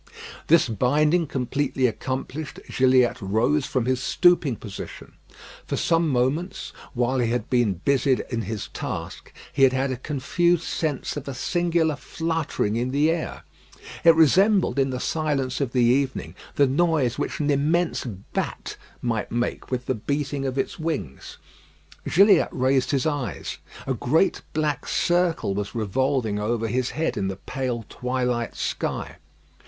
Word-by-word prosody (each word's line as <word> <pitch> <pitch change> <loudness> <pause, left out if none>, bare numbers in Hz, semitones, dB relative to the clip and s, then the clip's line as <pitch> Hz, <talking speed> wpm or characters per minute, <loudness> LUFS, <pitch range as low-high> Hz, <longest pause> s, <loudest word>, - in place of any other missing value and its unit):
This 165 -3 +5
binding 150 - +2
completely 130 0 -1
accomplished, 130 +3 -3
Gilliatt 130 -2 +3
rose 115 +9 +1
from 130 -3 0
his 130 0 0
stooping 175 -5 +3
position. 105 -2 -9 0.5
For - - -2
some 165 -1 +2
moments, 135 +8 -1 0.2
while 125 +2 +1
he 120 -2 +1
had 120 -1 -2
been 120 -6 +2
busied 135 -1 +2
in 115 -2 -1
his 110 -2 -5
task, - - -6 0.2
he 135 - -1
had 135 -1 +6
had 130 +1 0
a 130 - -3
confused 160 +6 +1
sense 150 -4 -2
of 145 - -6
a 140 - -4
singular 170 +1 +1
fluttering 160 -9 -2
in 120 +2 -1
the 145 +4 +2
air. 165 -1 -4 0.6
It 165 -1 +7
resembled, 185 +2 +4
in 135 0 +2
the 130 -1 -3
silence 140 -4 -1
of 135 -4 -1
the 125 -1 +2
evening, 130 +3 +1 0.2
the 145 - +5
noise 140 -3 +1
which - - -3
an 150 -1 +1
immense 160 +5 +1 0.3
bat - - -3 0.3
might 115 -3 -1
make 120 +1 -2
with 125 -1 -2
the - - 0
beating 140 +3 -2
of 130 0 -3
its 135 - -2
wings. 140 - -4 0.7
Gilliatt 195 0 +6
raised 130 +1 +1
his 135 -3 +1
eyes. 145 -5 -3 0.3
A 130 - 0
great 150 - +1
black 150 -3 -1
circle 175 - +1
was 100 +1 -4
revolving 115 0 0
over 115 +2 -1
his 125 +3 0
head 160 +1 -2
in 95 - 0
the 95 - -3
pale 125 -1 -4
twilight 125 -2 -2
sky. - - -3
135 Hz, 150 wpm, -24 LUFS, 125-155 Hz, 0.7 s, It